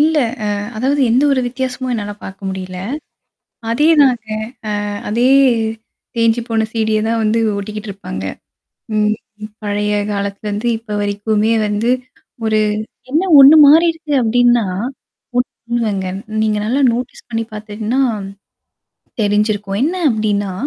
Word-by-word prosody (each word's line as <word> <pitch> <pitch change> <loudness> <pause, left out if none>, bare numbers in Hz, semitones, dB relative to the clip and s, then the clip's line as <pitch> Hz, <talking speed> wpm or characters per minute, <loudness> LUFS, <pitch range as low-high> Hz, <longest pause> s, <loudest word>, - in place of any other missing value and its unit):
இல்ல. 315 +1 +3 0.4
அ - - -3 0.2
அதாவது 270 +6 +1
எந்த 250 +4 +3
ஒரு 265 - +2
வித்தியாசமும் 255 0 -3
என்னால 205 -2 -3
பார்க்க 195 0 -7
முடியல. 185 -1 -5 0.9
அதேதாங்க. 275 -4 +3 0.6
அ - - -3 0.2
அதே 235 +4 +2 0.9
தேஞ்சுபோன 230 -1 +1
சீ-டி 220 -1 0
ய - - +1
தான் 230 0 0
வந்து 215 +2 +2 0.2
ஓட்டிக்கிட்டு 210 +1 -6
இருப்பாங்க. 185 - -7 0.7
ம் 210 0 +2 0.5
பழைய 210 0 -1 0.2
காலத்துல 200 +1 -3
வந்து 210 +4 -2
இப்ப 220 -2 -6
வரைக்குமே 210 +2 0
வந்து, 210 +3 0 0.6
ஒரு 215 0 +2 0.5
என்ன 320 +6 +2 0.2
ஒன்னு 275 +3 +9
மாறிருக்கு 325 0 +4
அப்பிடின்னா 240 0 +3 0.7
ஒன்னு 240 -1 -3
இல்லங்க 205 -5 -1 0.3
நீங்க 215 -1 +1
நல்லா 260 +6 +1
நோட்ஸ் 245 +1 -5
பண்ணி 225 -1 -1
பார்த்துட்டன்னா, 215 +4 -2 1.2
தெரிஞ்சிருக்கும். 205 -1 0
என்ன 330 +6 0
அப்பிடின்னா 210 -4 0
220 Hz, 120 wpm, -17 LUFS, 210-245 Hz, 1.2 s, ஒன்னு